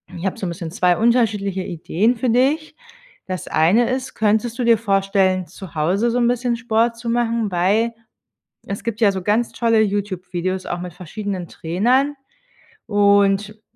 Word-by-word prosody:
Ich 170 +3 -6
habe - - -3
so 190 - -4
'n - - -2
bisschen 170 -1 -6
2 180 0 +2
unterschiedliche 215 -5 +1
Ideen 185 +7 0
für 245 +1 0
dich. 280 +7 +1 0.5
Das 185 -1 -5
eine 200 +11 +3
ist, 260 0 -3
könntest 220 +3 0
du - - +1
dir 230 -2 +5
vorstellen, 195 -3 +1
zu 185 +1 -11
Hause 190 +10 +1
so 245 - 0
'n 235 - +3
bisschen 245 0 0
Sport 230 0 0
zu 235 0 -5
machen, 230 -2 0
weil 205 +7 +1 0.7
es 200 - -5
gibt 230 -1 -4
ja 205 -3 +4
so 190 -1 -4
ganz 220 +4 +1
tolle 230 -2 +2
YouTube-Videos 185 -2 -2
auch 175 - -3
mit 180 -2 -7
verschiedenen 185 0 -5
Trainern, 250 - 0 0.7
und 205 0 +2
205 Hz, 165 wpm, -20 LUFS, 185-235 Hz, 0.7 s, dir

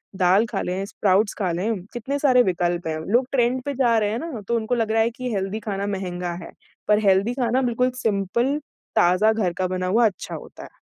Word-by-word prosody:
दाल 190 +4 +4
खा - - -1
लें, 185 +2 -2
स्प्राउट्स 200 +1 +1
खा 185 -4 0
लें, 190 +3 -2
कितने 265 +4 -3
सारे 255 -4 +5
विकल्प 175 -2 -1
हैं। 155 - -2
लोग 250 +3 +3
ट्रेंड 250 0 +2
पे 285 - -2
जा 235 -2 +4
रहे 210 -1 0
हैं 225 - -2
ना, 280 -7 -6
तो 235 - +1
उनको 225 +2 -1
लग 225 -2 0
रहा 225 0 +3
है 230 - +1
कि 250 0 -5
हेल्दी 195 +2 -2
खाना 200 0 -2
महँगा 180 -2 -4
है - - -11 0.4
पर 210 0 +5
हेल्दी 195 +5 +3
खाना 250 0 +1
बिल्कुल 250 0 +1
सिंपल, 225 +7 +1 0.4
ताज़ा 210 +2 +4
घर 190 -6 0
का 185 -1 0
बना 185 0 -2
हुआ 230 +5 +4
अच्छा 195 - -6
होता - - -10
है। - - -14
215 Hz, 220 wpm, -23 LUFS, 185-240 Hz, 0.4 s, सारे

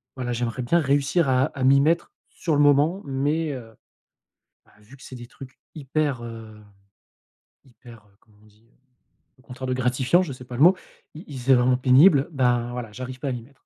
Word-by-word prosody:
voilà 125 -2 -4
j'aimerais 120 +1 -3
bien 170 +8 +2
réussir 140 +2 +1
à 130 0 +2
à 140 -3 -6
m'y 135 +1 +5
mettre 165 +4 0 0.2
sur 160 -4 -3
le 145 - +2
moment, 145 +6 +3
mais, 145 +3 -2
heu, 115 -4 -10 0.9
bah, - - -26
vu 110 +6 -17
que - - -18
c'est 130 - -10
des 120 0 -10
trucs 130 +2 -14 0.2
hyper, 145 -3 -2
heu, 115 -2 -10 1.1
hyper, 120 -2 -16
heu, 100 - -30
comment 105 -3 -28
on - - -22
dit? 105 +2 -27 0.7
Le 130 - -25
contraire 130 0 -8
de 130 - -1
gratifiant, 125 +6 +1
je 150 -7 -6
sais 125 - -12
pas 125 - -9
le - - -3
mot, 180 +3 +6 0.4
i 160 - -10
i 135 - -7
c'est 130 +2 +3
vraiment 125 +1 +2
pénible, 135 +4 +5
ben 120 -3 0
voilà, 120 -3 -6
j'arrive 130 +3 -8
pas 140 - -4
à - - -2
m'y 120 - -5
mettre. 135 +3 -24
130 Hz, 205 wpm, -23 LUFS, 120-145 Hz, 1.1 s, mot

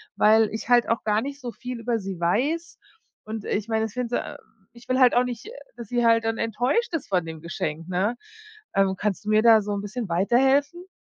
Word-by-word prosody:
weil 220 0 +4
ich 220 - -6
halt 240 -1 +5
auch 230 - 0
gar 210 0 +1
nicht 280 +2 -6
so 245 -2 -5
viel 245 +2 -7
über 230 0 -1
sie 190 -3 -6
weiß 275 - -1 0.5
und 215 -1 -6
ich 205 +1 -2
mein, 220 -1 0
das 220 -2 -3
find, 250 -1 -3
äh - - -3 0.4
ich 235 0 -17
will 255 0 +1
halt 250 -2 +5
auch 245 - +4
nicht, 245 - -6
äh, - - -8 0.2
dass 230 -4 -9
sie 240 -1 +1
halt 230 0 +4
dann 225 0 -1
enttäuscht 245 - 0
ist 325 - -3
von 180 -4 +1
dem 160 -1 -8
Geschenk, 165 0 -5
ne? 190 +6 0 0.6
Ähm, 195 -1 +2
kannst 210 +1 -3
du - - -3
mir 215 0 +4
da 225 -1 +6
so 205 0 -5
'n 200 - -3
bisschen 215 +3 -5
weiterhelfen? 270 - +2
225 Hz, 230 wpm, -24 LUFS, 205-250 Hz, 0.6 s, da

